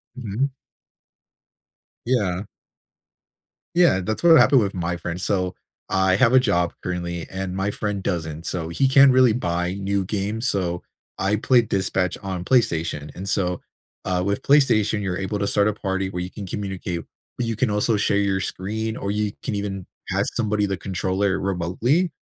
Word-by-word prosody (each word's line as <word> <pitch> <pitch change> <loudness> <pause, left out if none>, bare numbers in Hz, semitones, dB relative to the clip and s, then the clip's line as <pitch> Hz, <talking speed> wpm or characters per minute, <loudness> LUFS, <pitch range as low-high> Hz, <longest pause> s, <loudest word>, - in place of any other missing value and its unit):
Mhm. 125 +3 -2 1.5
Yeah. 100 -7 0 1.3
Yeah, 170 - +4
that's 110 +4 -3
what 165 -2 +8
happened 135 -4 +6
with 100 -2 -1
my 90 -1 -2
friend. 85 +1 -5
So, 90 -1 -1 0.3
I 95 -1 +3
have 115 +5 +4
a 130 - +8
job 90 -8 +1
currently, 85 -2 -3
and 95 -1 -4
my 95 +1 0
friend 105 -1 -3
doesn't, 80 -4 -3
so 85 -3 -3
he 110 +11 +2
can't 135 +1 +7
really 130 -3 +5
buy 90 -5 -1
new 100 0 -1
games, 105 +5 -2
so 90 -5 -1 0.3
I 100 +2 +1
played 120 +1 +3
Dispatch 95 -1 0
on 95 -2 -4
PlayStation, 85 - +1
and 95 +2 -6
so, 90 -3 0 0.4
uh, 90 -1 0
with 100 +5 -1
PlayStation, 120 -8 +3
you're 95 -3 -2
able 95 +2 -2
to 100 - 0
start 100 0 +2
a 105 - +1
party 95 -2 -2
where 90 -1 -4
you 90 - -7
can 100 - -7
communicate, 95 -3 -4 0.4
but 125 - -1
you 115 -1 -2
can 125 0 +1
also 105 +2 +1
share 100 -1 +1
your 100 -1 +1
screen, 110 +5 -3
or 100 - -3
you 105 0 -1
can 130 - -2
even 100 -2 -4 0.2
pass - - +1
somebody 105 -2 0
the 95 -1 -2
controller 95 +1 -1
remotely. 100 - 0
100 Hz, 170 wpm, -23 LUFS, 90-110 Hz, 1.5 s, what